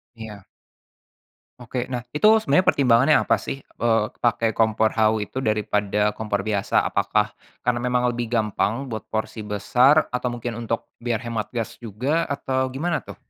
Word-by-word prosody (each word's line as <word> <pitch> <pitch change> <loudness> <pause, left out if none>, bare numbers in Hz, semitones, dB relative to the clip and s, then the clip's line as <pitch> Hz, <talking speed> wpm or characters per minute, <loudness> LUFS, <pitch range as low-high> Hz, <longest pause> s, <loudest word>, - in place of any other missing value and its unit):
Iya. 110 -3 -9 1.2
Oke 120 +1 -4
nah 125 - -1 0.2
itu 150 - -3 0.2
sebenarnya 165 -3 +2
pertimbangannya 135 +1 +4
apa - - +2
sih, 135 - -6
eee, 115 -4 0 0.2
pakai 115 -1 +1
kompor 110 0 +3
hawu 110 0 +3
itu 105 - -7
daripada 105 -1 +1
kompor 105 -2 -2
biasa 100 -2 +1
apakah, 105 0 +1 0.3
karena 125 0 0
memang 125 0 +1
lebih 120 0 -3
gampang 115 +3 0
buat 110 -3 -5
porsi 110 0 -3
besar 125 +8 +3
atau 125 0 -2
mungkin 120 -1 -5
untuk 115 -1 -3
biar 120 -2 -2
hemat 115 -3 -4
gas 115 -3 -4
juga 125 +9 -1
atau 130 -2 -2
gimana 165 +5 -2
tuh? - - -10
115 Hz, 155 wpm, -23 LUFS, 110-125 Hz, 1.2 s, pertimbangannya